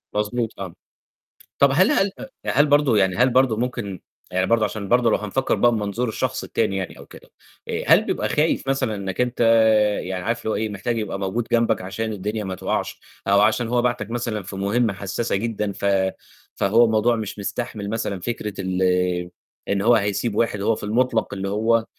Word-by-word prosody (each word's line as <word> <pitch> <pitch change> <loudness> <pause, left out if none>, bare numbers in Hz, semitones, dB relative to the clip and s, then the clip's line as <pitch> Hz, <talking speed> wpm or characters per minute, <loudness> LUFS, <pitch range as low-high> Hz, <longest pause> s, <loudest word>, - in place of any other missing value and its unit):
مضبوط، 110 +2 -1
آه. 95 -4 -6 0.9
طَب 140 - +6
هل 185 +6 +4
هل 195 0 +2 0.3
هل 145 +3 +3
برضه 145 -6 +3
يعني 95 -2 +2
هل 125 +2 +4
برضه 125 -3 +3
ممكن 120 -6 -3 0.3
يعني 95 +1 +1
برضه 115 -2 +3
عشان 105 -1 -5
برضه 120 +1 +3
لو - - +4
هنفكّر 105 +6 -1
بقى 120 - +4
بمنظور 110 +2 -2
الشخص - - -2
التاني 95 - -1
يعني 95 - -5
أو - - -12
كده، - - -15 0.4
آآ، - - -2
هل - - +6
بيبقى - - -1
خايف 150 -2 +1
مثلًا 130 -5 0
إنك 95 +1 -3
أنت 125 0 -1
آآ، 110 -2 +4
يعني 90 -1 -4
عارف 115 0 -1
اللي - - -3
هو - - 0
إيه، 110 0 -1
محتاج 105 +4 -3
يبقى 105 -3 -3
موجود 105 +5 -2
جنبك 115 0 +2
عشان 110 +4 -4
الدنيا 105 +2 -3
ما 95 -1 -4
توقعش، - - -3 0.3
أو 100 +1 +5
عشان 110 +2 +2
هو 120 +1 +1
بعتك 120 -2 -1
مثلًا 115 -4 -3
في 100 +1 -8
مهمة 100 +3 +1
حساسة 100 +4 -2
جدًا، 105 0 -2
ف 100 - -6 0.7
فهو 115 +5 +4
الموضوع 110 +1 +2
مش 110 -2 -5
مستحمل 105 0 -4
مثلًا 105 -3 -2
فكرة 105 +1 -4
ال 95 0 -2 0.9
إن 100 0 +1
هو 120 +3 +5
هيسيب 105 +1 0
واحد 105 -2 0
هو 110 +2 +2
في - - -10
المطلق، 115 +1 0
اللي 95 0 -3
هو 110 +3 +2
آآ، 115 - -5
110 Hz, 195 wpm, -22 LUFS, 100-120 Hz, 0.9 s, طَب